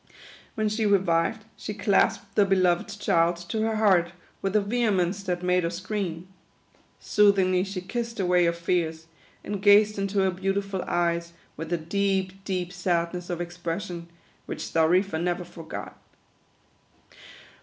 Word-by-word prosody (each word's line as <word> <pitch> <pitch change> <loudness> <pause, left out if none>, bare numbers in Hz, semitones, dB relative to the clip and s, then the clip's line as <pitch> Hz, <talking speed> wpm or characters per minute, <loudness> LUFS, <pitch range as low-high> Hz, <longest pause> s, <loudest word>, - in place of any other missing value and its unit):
When 215 -1 0
she 215 +1 0
revived, 195 +2 +2
she 210 - -6
clasped 200 -1 +1
the 205 - +4
be 195 0 +2
loved 185 +2 +1
child 170 -2 +2
to 220 - -1
her 220 0 0
heart 190 -5 +3 0.3
with 195 +1 -2
a - - +6
vehemence 200 -4 0
that 180 -2 -3
made 180 0 +3
her 165 - 0
scream. 180 -1 -4 0.7
Soothingly 190 -3 +3
she 195 -1 -5
kissed 230 +4 -4
away 180 -2 +3
her 170 - +3
fears, 170 -1 -1 0.4
and 205 -1 -4
gazed 205 +1 +5
into 195 +1 -2
her 190 -1 +2
beautiful 195 +1 -2
eyes 170 -1 0 0.2
with 160 +1 -7
a 175 - +2
deep, 195 +2 -1
deep 180 -2 -2
sadness 175 -1 -1
of 175 -1 -3
expression, 175 0 -5 0.4
which - - -5
Xarifa 165 +1 +2
never 175 +1 -1
forgot. 165 -2 -8
185 Hz, 145 wpm, -26 LUFS, 175-200 Hz, 0.7 s, a